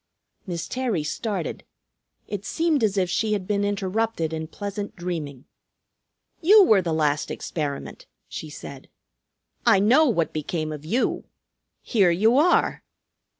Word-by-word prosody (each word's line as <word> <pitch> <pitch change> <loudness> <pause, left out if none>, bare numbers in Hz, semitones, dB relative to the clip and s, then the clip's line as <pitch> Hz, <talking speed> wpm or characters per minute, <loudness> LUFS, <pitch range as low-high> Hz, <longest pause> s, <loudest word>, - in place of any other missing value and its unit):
Miss 170 -3 -4
Terry 245 -11 -1
started. 190 +3 -3 0.6
It 205 -1 -5
seemed 320 +1 0
as 205 -2 +1
if 185 -2 +2
she 215 +4 0
had 200 -3 -2
been 205 0 0
interrupted 205 -3 -1
in 160 0 -4
pleasant 205 +3 -6
dreaming. 160 -7 -5 1.0
"You 410 +5 +7
were 215 - +5
the 170 -2 -2
last 150 -2 0
experiment," 145 -4 -5 0.2
she 155 - -7
said. 140 -2 -10 0.7
"I - - +5
know 250 +11 +5
what 170 - 0
became 155 +1 -3
of 150 -1 -7
you. 230 +11 0 0.6
Here 200 -7 +3
you 215 +8 +3
are!" 350 +4 +2
190 Hz, 135 wpm, -24 LUFS, 160-220 Hz, 1.0 s, You